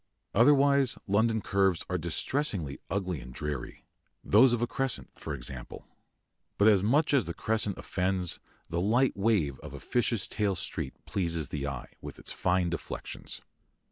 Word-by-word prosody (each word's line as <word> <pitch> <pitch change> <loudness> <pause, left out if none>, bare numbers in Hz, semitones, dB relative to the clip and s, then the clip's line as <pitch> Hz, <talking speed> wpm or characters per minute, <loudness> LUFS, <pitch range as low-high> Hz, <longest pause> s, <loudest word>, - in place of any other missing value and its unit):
Otherwise 140 +2 +4
London 110 +2 +2
curves 95 -3 +1
are 90 -1 -1
distressingly 85 - -1
ugly 95 -6 -2
and 65 - -10
dreary 75 -4 -5 0.4
those 115 +5 +6
of 120 - +1
a 120 - +2
crescent, 135 +1 -2
for - - -5
example. 65 -3 -6 0.7
But 105 +2 +6
as 100 -3 +5
much 145 +10 +2
as 125 - +3
the 85 - -4
crescent 110 -3 0
offends, 90 -1 0 0.3
the 85 +1 -1
light 120 +7 +3
wave 95 - +1
of - - -9
a - - -7
fish's 115 -4 0
tail 100 -3 0
street - - -3
pleases 85 -6 -1
the 70 -1 -3
eye, 70 -3 -6
with - - -8
its - - -5
fine 90 -1 +1
deflections. 85 - -5
100 Hz, 155 wpm, -29 LUFS, 85-115 Hz, 0.7 s, those